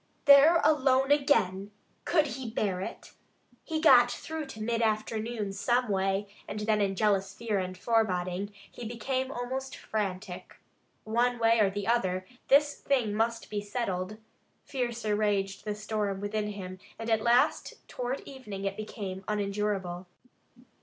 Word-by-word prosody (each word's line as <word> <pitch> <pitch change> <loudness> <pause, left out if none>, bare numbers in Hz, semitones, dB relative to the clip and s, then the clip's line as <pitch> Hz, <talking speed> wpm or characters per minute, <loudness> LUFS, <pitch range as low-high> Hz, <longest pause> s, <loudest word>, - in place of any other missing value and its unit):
There 285 +4 +8
alone 270 -2 +3
again! 205 -10 +2 0.4
Could 310 -3 +3
he 260 -4 -5
bear 195 -4 -1
it? - - -7 0.5
He 320 -2 -2
got 250 -6 +7
through 315 +3 -5
to 220 - -10
mid 230 +2 -1
afternoon 215 -1 -1
some 240 +4 +1
way, 195 +1 0 0.2
and 210 - -5
then 210 0 +2
in 195 -1 +1
jealous 195 -1 +1
fear 220 -4 -1
and 185 0 -4
foreboding 195 -3 0 0.2
he - - -9
became 255 +3 -2
almost 265 +1 -4
frantic. 190 -4 -4 0.5
One 240 +3 +1
way 230 0 +4
or 205 -2 +4
the 200 0 -4
other, 185 -5 +1 0.2
this 290 +1 +5
thing 250 -7 +1
must 230 +2 -1
be 205 -1 -1
settled. 205 -2 -3 0.5
Fiercer 235 -5 -2
raged 200 -2 0
the 210 -1 -2
storm 210 -2 -2
within 210 +1 -2
him 185 -3 -7 0.2
and 225 - -6
at 220 -1 +3
last 245 +7 +1
toward 250 +2 -3
evening 210 -8 -8
it 195 0 -1
became 195 -3 -6
unendurable. 200 -3 -2
215 Hz, 145 wpm, -29 LUFS, 195-245 Hz, 0.5 s, There